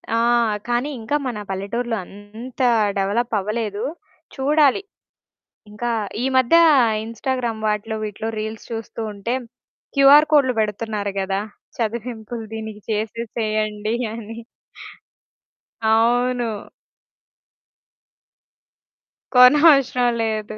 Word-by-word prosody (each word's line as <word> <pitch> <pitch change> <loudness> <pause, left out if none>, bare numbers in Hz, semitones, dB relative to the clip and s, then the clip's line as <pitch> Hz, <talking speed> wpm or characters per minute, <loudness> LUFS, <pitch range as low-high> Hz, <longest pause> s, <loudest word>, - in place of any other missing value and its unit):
ఆ! - - +2 0.5
కానీ, 240 +4 0
ఇంకా 225 +6 -2
మన 240 -4 -4
పల్లెటూరులో 225 +5 -3
అంత 215 +7 -10 0.4
డెవలప్ 210 +5 -1
అవ్వలేదు. 210 +1 -3 0.5
చూడాలి, 290 +2 +3 0.9
ఇంకా 235 +3 -3 0.3
ఈ - - +1
మధ్య 260 +5 +4 0.5
ఇన్‌స్టాగ్రామ్ 230 -1 -3
వాటిలో, 215 +1 -2
వీటిలో 215 +1 -4
రీల్స్ 220 0 -6
చూస్తుంటే, 225 0 -4 0.6
క్యూఆర్‌ 280 +2 +7
కోడ్‌లు 265 -4 +4
పెడుతున్నారు 210 -1 -3
కదా! 195 +1 -1 0.4
చదివింపులు 230 0 -4
దీనికి 220 -1 -7
చేసేసేయండి 215 0 -2 0.2
అని. 225 0 -8 1.4
అవును. 230 0 +1 2.7
కొనవసరం 260 -1 +6
లేదు. 215 -1 -3
225 Hz, 80 wpm, -21 LUFS, 215-245 Hz, 2.7 s, క్యూఆర్‌